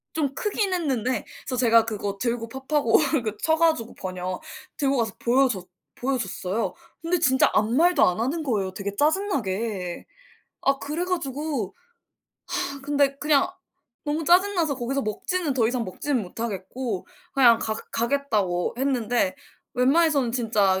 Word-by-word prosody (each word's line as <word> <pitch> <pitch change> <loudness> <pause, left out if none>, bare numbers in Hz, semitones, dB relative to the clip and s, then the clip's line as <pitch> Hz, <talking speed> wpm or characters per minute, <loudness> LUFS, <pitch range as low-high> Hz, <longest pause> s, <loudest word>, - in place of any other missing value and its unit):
좀 290 -4 0
크긴 405 +1 0
했는데 260 -8 -1 0.2
그래서 255 - -3
제가 230 -2 +5
그거 205 -2 -3
들고 235 -1 -1
파파고 265 0 +2 0.3
그 215 -2 -3
쳐 320 - +4
가지고 315 -8 +1
번역, 185 0 -4 0.4
들고 275 -2 +1
가서 225 -4 0
보여줬 240 -7 +2 0.3
보여줬어요. 230 -5 -2 0.3
근데 340 +2 0
진짜 265 -4 +4
아무 215 +1 +2
말도 345 +4 +4
안 180 +3 +1
하는 280 +8 -1
거예요 205 -9 -1
되게 200 +1 -5
짜증나게. 225 - -1 0.6
아 275 0 +2
그래 310 +5 -3
가지고 290 - -2 0.9
아 280 -5 -6
근데 280 -1 +2
그냥 290 -2 +3 0.6
너무 305 +2 -1
짜증나서 350 -3 +3
거기서 265 +3 -1
먹지는 300 - -1
더 235 -4 +3
이상 245 -1 -1
먹지는 245 +6 -2
못하겠고 205 +2 -4 0.3
그냥 240 -5 +6
가 220 - -1 0.2
가겠다고 225 -8 0
했는데 245 -7 +1 0.4
웬만해서는 275 0 +3
진짜 215 -6 +2
255 Hz, 310 characters per minute, -25 LUFS, 215-295 Hz, 0.9 s, 그냥